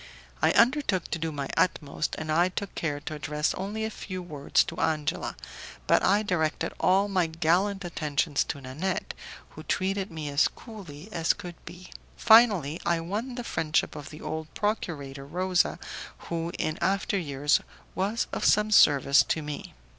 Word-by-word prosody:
I - - +4
undertook 235 - +2
to 165 - -1
do 160 0 -2
my 140 -2 -4
utmost, 150 -4 0
and 155 0 -4
I 170 +3 +3
took 195 +2 -5
care 145 -3 -2
to 155 - -6
address 150 0 -1
only 210 +3 -3
a 220 - -3
few 185 -3 -6
words 150 -5 +1
to - - -7
Angela, 155 -2 -1 0.5
but - - +3
I 205 +3 +3
directed 160 -6 -1
all 195 +2 +3
my 185 -4 +1
gallant 175 +5 +1
attentions 150 -3 0
to 140 - -4
Nanette, 145 +9 -3 0.4
who - - -11
treated 195 +1 -1
me 160 -2 -6
as 140 +1 +3
coolly 190 -8 -11
as 165 -1 +2
could 180 -4 -8
be. 180 +1 -11 0.3
Finally, 205 - +5
I 170 -1 +1
won 210 +9 -4
the 245 - -4
friendship 160 -9 0
of 150 -2 -8
the 155 - -11
old 160 0 -5
procurator 145 -10 -3
Rosa, 180 +3 +1 0.4
who, 170 0 -4
in 155 +1 -2
after 195 +1 +1
years, 145 -2 +1 0.3
was 205 +5 0
of - - -2
some 210 +1 +4
service 140 -7 +6
to 160 - -1
me. 150 -1 -7
170 Hz, 165 wpm, -27 LUFS, 150-195 Hz, 0.5 s, service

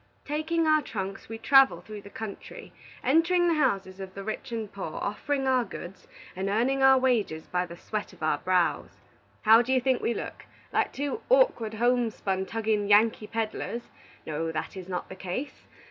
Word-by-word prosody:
"Taking 320 +3 0
our 310 -1 +4
trunks, 195 -6 -6
we 225 - -5
travel 270 +4 +5
through 215 -2 -9
the 200 - -12
country, 215 -1 -8 0.3
entering 345 +5 +3
the 340 - +3
houses 195 -11 0
of 190 -1 -8
the 195 - -6
rich 220 +5 -5
and 225 -3 -4
poor, 190 -5 -5
offering 270 +7 -2
our 260 -2 +3
goods, 190 -4 -9 0.3
and 190 +1 -2
earning 250 +6 +1
our 265 0 +7
wages 230 -11 +1
by 180 0 -1
the 170 0 -10
sweat 215 +3 -4
of - - -12
our 155 - +1
brows. 180 -1 0 0.5
How 225 +1 +8
do 245 +2 -2
you 260 - +4
think 255 0 +1
we 235 - 0
look? - - -6 0.3
Like - - +1
two 285 +9 -3
Awkward, - - +3
Homespun, 225 -5 0
Tugging 220 -2 0
Yankee 210 +1 +4
peddlers? 225 +1 -4 0.3
No, 160 +1 -2
that 155 +4 -4
is 185 -1 -8
not 180 -1 -3
the 185 - -9
case. 190 +10 -6
225 Hz, 180 wpm, -27 LUFS, 195-265 Hz, 0.5 s, How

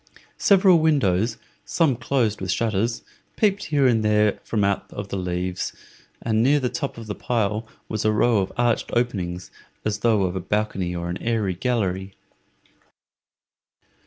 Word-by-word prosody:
Several 190 -3 +5
windows, 115 - +2 0.3
some 160 -7 +1
closed 115 -5 0
with 95 - -4
shutters, 110 +3 0 0.3
peeped 200 -4 +1
here 145 -3 +2
and 115 -4 +3
there 105 -1 +2
from 105 -3 -1
out 100 0 0
the 100 -1 -6
leaves, 90 0 -3 0.5
and 110 -1 +1
near 140 +5 +4
the 125 -2 -1
top 140 -3 -4
of 115 - -8
the 105 - -4
pile 110 -1 -1 0.2
was 110 -2 -3
a 110 - +3
row 110 +1 +3
of 95 - -2
arched 120 -1 +1
openings, 90 -7 -2 0.3
as 105 -1 -1
though 110 -3 +3
of 90 0 -1
a - - -1
balcony 95 -2 -1
or 85 0 -3
an 90 +1 -4
airy 110 -5 0
gallery. 95 -3 -2
110 Hz, 155 wpm, -23 LUFS, 95-120 Hz, 0.5 s, Several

